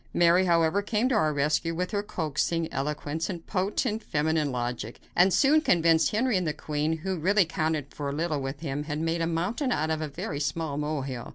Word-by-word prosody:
Mary, 175 +2 +5
however, 170 +2 +3
came 215 +3 0
to 260 - 0
our 155 -9 +3
rescue 150 +3 0
with 180 +2 -2
her 205 -2 0
coaxing 165 -3 -1
eloquence 150 +3 -2
and 170 -4 -6
potent, 210 +4 -1
feminine 150 -1 0
logic, 120 -2 -4 0.2
and 185 +2 +5
soon 290 - +4
convinced 165 - +3
Henry 220 -2 +1
that 180 - -2
the 155 - 0
queen, 150 +2 -2
who 190 -2 -1
really 195 +4 +3
counted 160 -3 -1
for 145 -1 -3
little 155 0 -1
with 135 +1 -5
him, 145 -1 -3
had 150 0 -3
made 165 +1 -1
a 165 - +1
mountain 185 - -1
out 155 -6 0
of 160 0 -1
a 155 - -2
very 145 0 -5
small 150 0 -2
mole 150 -1 -2
hill. 125 -3 -6
160 Hz, 205 wpm, -27 LUFS, 150-185 Hz, 0.2 s, Mary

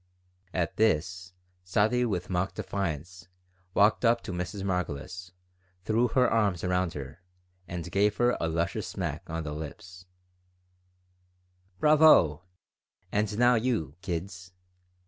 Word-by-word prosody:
At 85 -3 -2
this, 90 -3 0 0.3
Sadie, 110 +6 +2
with 90 -5 -2
mock 95 +1 -1
defiance, 90 -1 -4 0.5
walked 105 +3 +4
up 115 0 +3
to - - -6
Mrs. 90 +2 -4
Margolis, 90 -1 -3 0.5
threw 115 +3 +2
her 125 +2 +3
arms 100 -6 +1
around 90 -1 0
her, 70 +4 -8 0.5
and 85 -2 -6
gave 105 +1 +2
her 120 0 +3
a 80 - 0
luscious 85 +1 -2
smack - - -5
on 80 0 -3
the 75 -1 -5
lips 90 +4 -9 1.7
"Bravo! 150 - +6 0.7
And 105 0 0
now 125 +1 +5
you, 110 - 0
kids!" 90 0 -5
90 Hz, 120 wpm, -28 LUFS, 85-105 Hz, 1.7 s, Bravo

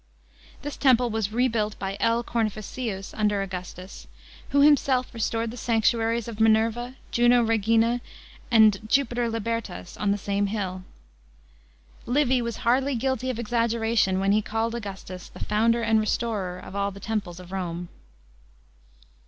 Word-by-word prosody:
This 290 0 -5
temple 250 -3 +4
was 215 -2 -1
rebuilt 225 -3 0
by 195 0 -4
L. 230 +1 +2
Cornificius 215 -2 -3
under 210 -2 +1
Augustus, 185 0 -8 0.4
who 280 - +3
himself 275 -3 +3
restored 230 0 -1
the 245 - -9
sanctuaries 230 0 +1
of 225 -2 -7
Minerva, 225 +3 +2 0.2
Juno 240 0 +4
Regina, 225 +2 +2 0.5
and 220 -4 +6
Jupiter 245 -2 +1
Libertas 225 -5 -4
on 205 - 0
the 200 - +1
same 200 0 -1
hill. 190 -3 -3 1.3
Livy 260 0 +2
was 235 -1 -3
hardly 260 +3 +2
guilty 260 +1 -1
of 255 - -2
exaggeration 230 -4 +1
when 195 +1 +2
he 210 +1 +3
called 225 +2 -2
Augustus 195 -5 -7
"the - - -13
founder 230 +2 +2
and 225 -1 +3
restorer 215 -4 -1
of 185 - -10
all 200 0 0
the 200 0 -10
temples" 200 -5 -3
of 180 0 -12
Rome. 175 -2 -4
225 Hz, 140 wpm, -25 LUFS, 200-235 Hz, 1.3 s, and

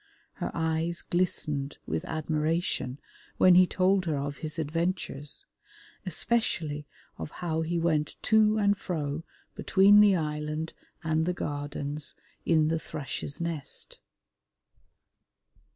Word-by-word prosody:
Her - - -3
eyes 160 +1 0
glistened 150 -5 -1
with 80 0 -2
admiration 155 -3 -1 0.4
when 185 - +7
he 180 +1 +7
told 185 +1 +2
her 155 -3 0
of 140 +1 -3
his 155 0 -5
adventures, 160 -2 -2 0.6
especially 160 -7 0 0.3
of - - -4
how 160 -1 -2
he 170 +2 -1
went 155 -3 +1
to 220 0 +4
and 205 -1 +3
fro 155 -5 -3 0.3
between 200 +2 +6
the 205 -2 +6
island 150 0 -2 0.3
and 160 0 +1
the 180 - +1
Gardens 145 -1 -4 0.3
in 155 -2 +4
the 160 +1 +1
Thrush's 140 -1 -5
Nest. 165 -4 -4
160 Hz, 115 wpm, -29 LUFS, 150-180 Hz, 0.6 s, when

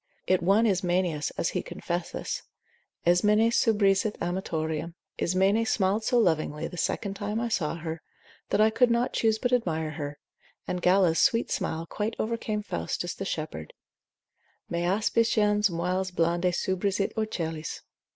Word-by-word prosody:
It 185 -1 +2
won 200 +6 +4
Ismenias, 180 -6 +1
as - - +1
he 180 - -2
confesseth, 175 0 -4 0.6
Ismene 210 +6 +4
subrisit 210 -2 +2
amatorium, 165 -2 -3 0.2
Ismene 190 +5 +2
smiled 210 -1 +1
so 245 +2 +2
lovingly 160 -6 +1
the - - -9
second 195 +3 -2
time 210 +2 -3
I 235 0 -1
saw 165 -8 0
her, 165 -1 -5 0.5
that - - +1
I 215 +1 +5
could 245 +2 +4
not 235 +1 +1
choose 220 -1 +2
but 245 +3 -1
admire 160 -10 0
her: 145 -2 -5 0.5
and 180 0 -2
Galla's 180 -2 +4
sweet 230 +1 +3
smile 160 +1 -2
quite 210 +6 -3
overcame 215 -1 -2
Faustus 130 - -3
the 195 - -6
shepherd, 155 - -5 1.0
Me 170 - 0
aspiciens 210 +1 +2
moils 180 +2 -1
blande 175 0 +1
subrisit 190 +2 -1
ocellis. 165 -8 -3
185 Hz, 140 wpm, -27 LUFS, 170-215 Hz, 1.0 s, I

